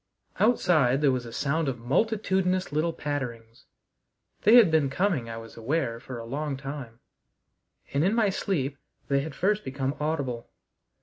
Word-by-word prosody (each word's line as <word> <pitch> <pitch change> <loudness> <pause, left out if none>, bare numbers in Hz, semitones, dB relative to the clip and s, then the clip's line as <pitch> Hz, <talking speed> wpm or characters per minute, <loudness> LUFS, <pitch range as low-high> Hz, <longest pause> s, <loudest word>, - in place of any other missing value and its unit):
Outside 155 - +3
there 145 -3 +4
was 125 -2 -2
a - - -8
sound 145 +5 0
of 130 -2 -1
multitudinous 185 - 0
little 155 +3 +1
patterings. 120 -7 -5 0.8
They 220 +4 +6
had 230 -9 +8
been 155 -4 +3
coming, 165 - 0
I 115 - -5
was 115 0 -10
aware, 115 -1 -1
for 125 0 -8
a 115 - -7
long 140 +3 -3
time, 135 -4 -7 1.0
and 140 +2 +2
in 195 +5 +2
my 215 -4 +3
sleep 140 -9 -2 0.3
they 140 0 +3
had 140 +1 -5
first 210 +3 +1
become 135 +1 -2
audible. 140 -6 -2
140 Hz, 160 wpm, -27 LUFS, 125-175 Hz, 1.0 s, had